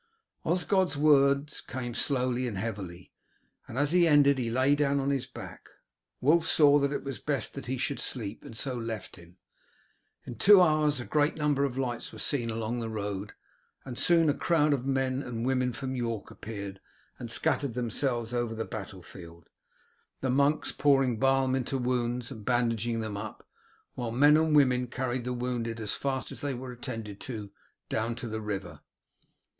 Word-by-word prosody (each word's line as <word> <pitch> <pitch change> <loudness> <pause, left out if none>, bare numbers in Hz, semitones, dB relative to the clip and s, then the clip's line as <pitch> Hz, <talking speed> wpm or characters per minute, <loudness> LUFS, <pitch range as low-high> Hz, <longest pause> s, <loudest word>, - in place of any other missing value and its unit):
Osgod's 180 -1 +1
words 140 -1 +3
came 120 -2 -5
slowly 125 -1 0
and 105 -5 -4
heavily, 95 -4 -5 0.6
and 115 - -7
as 145 +2 +2
he 175 -1 +5
ended 140 -3 +5
he 120 -2 -1
lay 130 +4 +3
down 140 -1 +2
on 140 +1 0
his 135 -2 -1
back. 130 - -10 0.5
Wulf 160 +5 +3
saw 145 -2 +6
that 140 0 +1
it 145 - -3
was 135 -2 -5
best 145 -2 -1
that 140 - -8
he 130 +1 -2
should 140 +3 -2
sleep, 110 -4 -4
and 115 - -10
so 135 +2 -2
left 115 -3 -5
him. 85 +2 -16 0.9
In 120 - -8
two 205 0 +8
hours 155 -4 +3
a 120 - -5
great 150 0 +1
number 145 -2 +1
of 130 -2 -4
lights 125 -3 -3
were - - -11
seen 120 -5 0
along 115 +1 -2
the 115 -1 -3
road, 105 -1 -4 0.5
and 130 -2 -6
soon 165 +4 +4
a 145 - +4
crowd 150 -2 +2
of 135 -1 -2
men 130 -1 0
and 120 -3 -4
women 130 -1 +1
from 130 +2 -5
York 115 -4 -3
appeared 100 -3 -7 0.4
and 120 - -6
scattered 120 +2 +1
themselves 120 0 -1
over 120 -2 -1
the 115 - -3
battlefield, 90 -5 -10 0.7
the 130 - 0
monks 140 +3 +2
pouring 135 -5 +2
balm 135 -1 +3
into 130 +1 -1
wounds 125 0 -1
and 110 -5 -8
bandaging 115 -1 0
them 110 -2 -4
up, 110 +1 -8 0.5
while 120 -2 -4
the 120 - -5
men 145 +2 +7
and 160 -1 +3
women 125 -3 +4
carried 125 0 -3
the 125 - -2
wounded, 120 -2 -3
as 105 -2 -2
fast 135 -1 -3
as - - -1
they 140 -2 -2
were 125 +1 -7
attended 115 -4 -6
to, 105 -6 -6 0.4
down 115 +2 -1
to 120 0 -6
the 110 0 -4
river. 100 -4 -5
125 Hz, 180 wpm, -29 LUFS, 115-140 Hz, 0.9 s, two